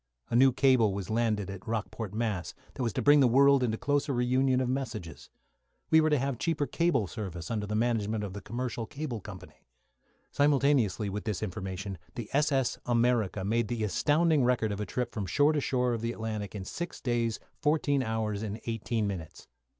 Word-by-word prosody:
A - - +1
new 130 +2 +6
cable 125 -6 +3
was 100 0 -4
landed 110 -4 0
at 95 -1 -10
Rockport, 110 -1 -3
Mass., 105 -5 -2 0.2
that 135 - -6
was 120 -2 0
to - - -2
bring 145 0 +7
the 135 - +6
world 140 +2 +5
into 115 -3 0
closer 145 +3 0
reunion 130 +1 +2
of 130 - 0
messages. 115 - -4 0.6
We 160 - +7
were 155 - +3
to 150 - +3
have 135 -2 -2
cheaper 165 -3 0
cable 170 -8 +1
service 90 -2 -6
under 105 -2 -2
the 105 - -2
management 110 -2 0
of 100 -2 -5
the 100 - -7
Commercial 120 +1 -4
Cable 140 -7 -5
Company. 95 -2 -12 0.6
Simultaneously 140 -8 +2
with 105 +3 -4
this 105 -2 -2
information, 95 -1 -5 0.2
the 115 -3 -6
s.s. 140 -3 +1
"America" 115 -5 +1
made 115 +2 +1
the 115 -1 -2
astounding 150 - +2
record 120 -3 +1
of 100 0 -3
a 105 - -3
trip 125 -2 -3
from 105 -4 -3
shore 145 - +3
to 150 - 0
shore 125 -2 +1
of 115 - -3
the 115 +1 -2
Atlantic, 110 -3 -4
in 95 -2 -5
six 175 - -5
days 120 -2 -1 0.2
fourteen 145 -2 +2
hours 110 -3 -2
and 110 0 -4
eighteen 115 -1 -1
minutes. 90 -6 -6
115 Hz, 190 wpm, -29 LUFS, 105-135 Hz, 0.6 s, bring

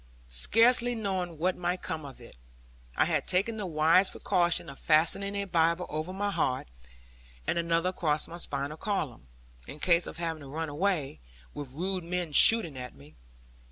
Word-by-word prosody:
Scarce 230 - +4
knowing 195 -8 -3
what 180 +4 0
might 180 +1 -3
come 155 -2 -4
of 135 -2 -10
it, 120 - -14 0.6
I - - +4
had - - -1
taken 200 +5 0
the 205 -3 -4
wise 165 +4 +4
precaution 175 -3 +1
of 140 - -9
fastening 170 +6 +2
a 200 0 -1
Bible 170 -1 +1
over 155 +4 -4
my 200 +2 -2
heart, 130 - -1 0.8
and - - 0
another 170 +1 +1
across 155 -5 -1
my 170 - -8
spinal 140 0 -3
column, 155 - -3 0.4
in 140 - -8
case 170 +2 +3
of - - -7
having 165 -2 -3
to 140 - -10
run 160 +2 -4
away, 150 - -1 0.3
with 145 -3 -7
rude 180 +6 -3
men 175 -1 -3
shooting 165 - +6
after 125 - -9
me. 75 +2 -17
170 Hz, 170 wpm, -29 LUFS, 150-190 Hz, 0.8 s, shooting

